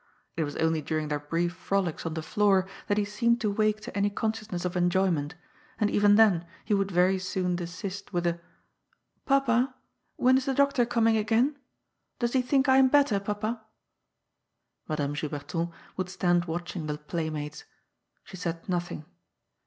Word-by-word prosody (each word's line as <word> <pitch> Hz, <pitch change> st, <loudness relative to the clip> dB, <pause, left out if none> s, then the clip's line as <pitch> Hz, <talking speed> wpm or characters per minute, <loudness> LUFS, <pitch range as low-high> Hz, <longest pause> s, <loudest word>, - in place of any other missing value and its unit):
It 160 Hz, -, 0 dB
was 145 Hz, -, -6 dB
only 160 Hz, -1 st, +1 dB
during 155 Hz, 0 st, -2 dB
their 150 Hz, -1 st, -1 dB
brief 165 Hz, +4 st, -1 dB
frolics 185 Hz, -4 st, -2 dB
on 160 Hz, -, -4 dB
the 160 Hz, -, -3 dB
floor 195 Hz, +1 st, +2 dB, 0.2 s
that 205 Hz, -, +1 dB
he 210 Hz, -, +2 dB
seemed 235 Hz, +3 st, +1 dB
to 210 Hz, -2 st, +1 dB
wake 215 Hz, +1 st, +1 dB
to -, -, -9 dB
any 200 Hz, 0 st, +2 dB
consciousness 215 Hz, -3 st, -3 dB
of 180 Hz, 0 st, -2 dB
enjoyment, 175 Hz, -3 st, +1 dB, 0.4 s
and 210 Hz, -2 st, +2 dB
even 205 Hz, 0 st, +5 dB
then 195 Hz, -6 st, +4 dB, 0.2 s
he -, -, 0 dB
would 195 Hz, -1 st, +1 dB
very 185 Hz, +1 st, +3 dB
soon 185 Hz, -1 st, -1 dB
desist 185 Hz, +3 st, -6 dB
with 175 Hz, -2 st, -1 dB
a 170 Hz, 0 st, 0 dB, 0.4 s
" -, -, -45 dB
Papa, 260 Hz, -1 st, +2 dB, 0.4 s
when 255 Hz, +1 st, +4 dB
is 260 Hz, -, -6 dB
the 270 Hz, -, 0 dB
doctor 280 Hz, -3 st, +3 dB
coming 225 Hz, -2 st, +3 dB
again? 230 Hz, +7 st, +2 dB, 0.6 s
Does 240 Hz, -1 st, -1 dB
he 260 Hz, -, +4 dB
think 265 Hz, +2 st, +2 dB
I 265 Hz, 0 st, +6 dB
am 265 Hz, 0 st, +7 dB
better, 275 Hz, -6 st, +3 dB
papa? 215 Hz, +3 st, -3 dB, 0.6 s
" -, -, -53 dB
Madame 145 Hz, -2 st, -1 dB
Juberton 150 Hz, +3 st, -3 dB, 0.3 s
would 185 Hz, -1 st, -2 dB
stand 175 Hz, -1 st, +1 dB
watching 175 Hz, -1 st, -4 dB
the 150 Hz, 0 st, -2 dB
playmates. 150 Hz, -1 st, -4 dB, 0.6 s
She 185 Hz, -, -11 dB
said 170 Hz, -2 st, -4 dB
nothing. 175 Hz, -4 st, -3 dB
190 Hz, 170 wpm, -28 LUFS, 170-220 Hz, 0.6 s, am